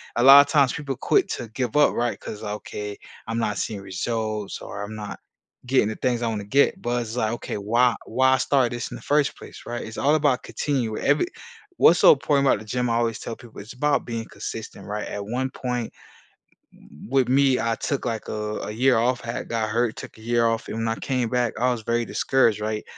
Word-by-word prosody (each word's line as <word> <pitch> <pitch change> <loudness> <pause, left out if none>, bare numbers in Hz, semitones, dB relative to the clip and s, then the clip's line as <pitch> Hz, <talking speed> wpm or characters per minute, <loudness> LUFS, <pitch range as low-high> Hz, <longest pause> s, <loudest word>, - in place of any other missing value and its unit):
a 120 - +1
lotta 140 +2 +9
times 140 -5 +4
people 140 -2 -4
quit 390 - +2
to 120 - -4
give 120 +2 -3
up, 150 0 +5
right? 120 0 -1
'Cause, 105 - -8
"Okay, 105 0 -5 0.3
I'm 115 +1 -2
not 105 -2 -1
seeing 105 -3 -3
results 105 +2 -3
or 100 - -6
I'm 105 +1 -7
not 105 -1 -7 0.5
getting 130 -3 +3
the 110 - -3
things 125 -2 -1
I 120 - 0
wanna 110 -3 -2
get." 135 +8 +2
But 120 0 -1
it's 115 -1 -6
like, 110 -3 0
okay, 120 - -5
why 115 +4 +2
why 130 +2 +3
start 130 -1 +2
this 120 -1 -4
in - - -6
the - - -14
first 145 -1 +1
place, - - -12
right? 120 0 -4
It's 110 - -8
all 145 +2 +3
about 145 -5 +2
continue 125 -7 -2
every 145 +1 +2 0.5
what's 170 - +6
so - - +9
important 140 0 +1
about 130 - +3
the 110 - -11
gym, 125 +3 -1
I 115 - +1
always 115 -2 0
tell 115 - -6
people, 115 -4 -12
it's 105 - -11
about 145 +3 +1
being 115 -1 -4
consistent, 110 -1 -7
right? 105 +1 -4
At 100 0 -5
one 125 +5 -2
point, 125 -3 -4 1.2
with 135 -1 +2
me, 135 0 +3
I 115 0 0
took, 140 +3 -3
like, 115 -3 -3
a 105 0 -3
a - - -5
year 125 +3 +3
off, 120 +2 +1
I - - -1
had - - -6
got 110 -2 -1
hurt, 115 +1 0
took - - -9
a - - -15
year 120 +1 +1
off, 115 0 -1
and - - -4
when 115 0 -1
I 115 - 0
came 125 0 -1
back, 125 -2 0
I 125 +1 +3
was 120 -2 -3
very 115 +1 0
discouraged, 115 -5 +2
right? 105 0 -2
120 Hz, 225 wpm, -24 LUFS, 110-130 Hz, 1.2 s, lotta